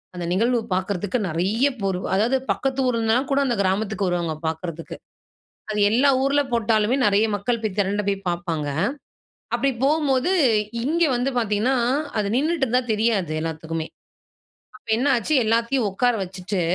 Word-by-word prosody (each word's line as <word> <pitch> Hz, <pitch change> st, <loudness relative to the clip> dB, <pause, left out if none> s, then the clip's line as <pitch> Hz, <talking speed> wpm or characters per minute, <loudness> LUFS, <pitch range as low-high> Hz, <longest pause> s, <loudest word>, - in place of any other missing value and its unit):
அந்த 175 Hz, -1 st, -4 dB
நிகழ்வு 235 Hz, +5 st, +2 dB, 0.2 s
பார்க்கறதுக்கு 190 Hz, +4 st, -2 dB
நெறைய 195 Hz, -, +1 dB
பேர். 190 Hz, -2 st, 0 dB, 0.2 s
அதாவது 230 Hz, +7 st, +2 dB
பக்கத்து 270 Hz, 0 st, -2 dB
ஊர்ல 235 Hz, -2 st, +1 dB
இருந்துலாம் 230 Hz, +5 st, +1 dB
கூட 275 Hz, -, +3 dB
அந்த 245 Hz, -3 st, 0 dB
கிராமத்துக்கு 195 Hz, +1 st, 0 dB
வருவாங்க 170 Hz, -3 st, -1 dB
பார்க்கறதுக்கு. 165 Hz, 0 st, -5 dB, 0.8 s
அது 210 Hz, -, -2 dB
எல்லா 260 Hz, +5 st, +4 dB
ஊர்ல 285 Hz, +1 st, +3 dB
போட்டாலுமே 220 Hz, +1 st, +2 dB
நெறைய 205 Hz, +1 st, +3 dB
மக்கள் 230 Hz, +4 st, -1 dB
போய் 215 Hz, -3 st, -3 dB
திரண்ட 205 Hz, +1 st, +1 dB
போய் 200 Hz, -1 st, +1 dB
பார்ப்பாங்க. 170 Hz, -4 st, -2 dB, 0.9 s
அப்படி 275 Hz, +3 st, +1 dB
போம்போது 285 Hz, +1 st, +2 dB, 0.5 s
இங்க 335 Hz, +4 st, +1 dB
வந்து 245 Hz, +3 st, 0 dB
பார்த்தீங்கன்னா, 225 Hz, +3 st, +1 dB, 0.4 s
அது 205 Hz, -, 0 dB
நின்னுட்டுருந்தா 270 Hz, -4 st, +1 dB
தெரியாது 210 Hz, -7 st, 0 dB
எல்லாத்துக்குமே. 160 Hz, 0 st, -4 dB, 0.9 s
அப்ப 245 Hz, -, -37 dB
என்ன 260 Hz, -, 0 dB
ஆச்சு, 240 Hz, +6 st, -1 dB
எல்லாத்தையும் 230 Hz, +1 st, +1 dB
உட்கார 245 Hz, +5 st, +1 dB
வச்சுட்டு 185 Hz, +1 st, -4 dB
215 Hz, 140 wpm, -23 LUFS, 185-250 Hz, 0.9 s, எல்லா